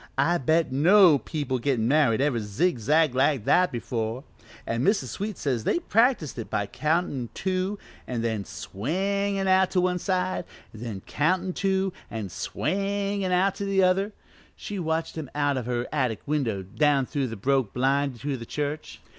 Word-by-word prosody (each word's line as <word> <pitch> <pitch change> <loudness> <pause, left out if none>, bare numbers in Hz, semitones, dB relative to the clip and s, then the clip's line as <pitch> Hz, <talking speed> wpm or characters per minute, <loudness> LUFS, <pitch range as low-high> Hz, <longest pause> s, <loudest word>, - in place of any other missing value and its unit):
I 170 +6 +2
bet 155 +3 +2
no 165 +2 +6
people 140 -5 -3
gettin' 120 -3 0
married 135 -4 +3
ever 140 -4 +1
zig 115 - 0
zagged 150 +5 +3
like 130 -3 +2
that 180 0 +4
before, 115 +1 -3 0.4
an' 115 +2 -1
Mrs. 195 - +2
Sweet 205 - -4
says 125 -6 -1
they - - +1
practised 230 - +1
it 115 - -6
by 100 - -1
countin' 150 - -1
two 190 +2 -1 0.3
an' 120 -3 -2
then 110 -3 -1
swingin' 190 - -2
out 190 0 +4
to 185 - +1
one 180 0 +1
side, 185 -1 -1 0.3
an' 110 - -11
then 110 -5 -5
countin' 185 +5 0
two 190 0 0 0.2
an' 110 -4 -5
swingin' 200 - -2
out 185 +2 +3
to 200 - -5
the 195 -1 +2
other 190 +3 +2 0.4
she 205 -2 -6
watched 160 -1 -2
'em 145 -4 -6
out 145 -1 +1
of 125 -3 -3
her 120 0 -1
attic 130 -7 -1
window 125 -10 -1
down 135 +8 +2
through 140 -1 -2
the 115 - -6
broke 130 +1 +1
blind 135 0 0
to 145 -1 -2
the 115 - -8
church. 150 +1 -4
150 Hz, 170 wpm, -26 LUFS, 125-185 Hz, 0.4 s, no